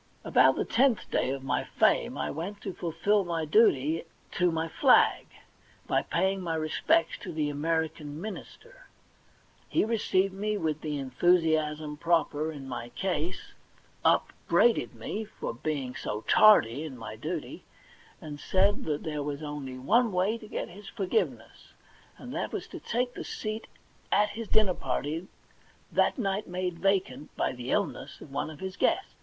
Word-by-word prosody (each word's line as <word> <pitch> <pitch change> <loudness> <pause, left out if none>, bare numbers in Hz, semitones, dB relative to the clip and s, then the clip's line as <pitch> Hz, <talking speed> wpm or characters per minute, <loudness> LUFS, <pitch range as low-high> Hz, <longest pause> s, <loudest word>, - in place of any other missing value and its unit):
About - - +5
the - - -1
tenth 240 -5 +2
day - - +1
of 135 0 -3
my 135 - 0
fame - - +2
I - - -2
went 185 +7 -5
to 195 - -5
fulfil 180 +5 +1
my 165 -3 -2
duty 155 - +3 0.3
to 180 0 +2
my 165 0 -1
flag - - +4 0.6
by - - +2
paying 190 +2 0
my 165 -2 -2
respects 160 - +1
to 185 - -7
the 155 -2 -1
American 155 0 -2
minister. 465 - -9 0.8
He - - +2
received 195 -4 +1
me 210 +2 -1
with 155 -4 -2
the 150 -2 -3
en 135 -2 -5
thusiasm 155 -1 +2
proper 160 -2 +1
in 140 -3 -8
my 120 -2 -5
case, 180 +3 -3 0.5
upbraided 235 -1 +2
me 215 - -4
for 210 - -6
being 130 0 -3
so 105 -4 -4
tardy 145 - +5
in 145 -5 -7
my 115 - -7
duty, - - -5 0.6
and 150 -2 -8
said 200 +5 +2
that 150 -2 -2
there 150 -2 -3
was 145 +1 -4
only 145 -3 -5
one 230 - +3
way 185 +4 +1
to 215 - -11
get - - -4
his 195 +3 -11
forgiveness, 185 - -2 0.4
and - - -9
that - - -2
was - - -4
to - - -8
take 245 +2 -1
the - - -6
seat 215 +1 -5 0.4
at 210 0 +4
his 220 +2 -6
dinner 210 -3 +3
party 155 +5 -3 0.6
that - - +2
night 200 -3 -1
made 180 -1 -3
vacant 180 -7 0
by - - 0
the 125 0 -7
illness 160 -10 -2
of 140 - -12
one 145 +2 -2
of 155 -2 -11
his 190 0 -5
guests. 385 - +1
165 Hz, 160 wpm, -29 LUFS, 150-200 Hz, 0.8 s, About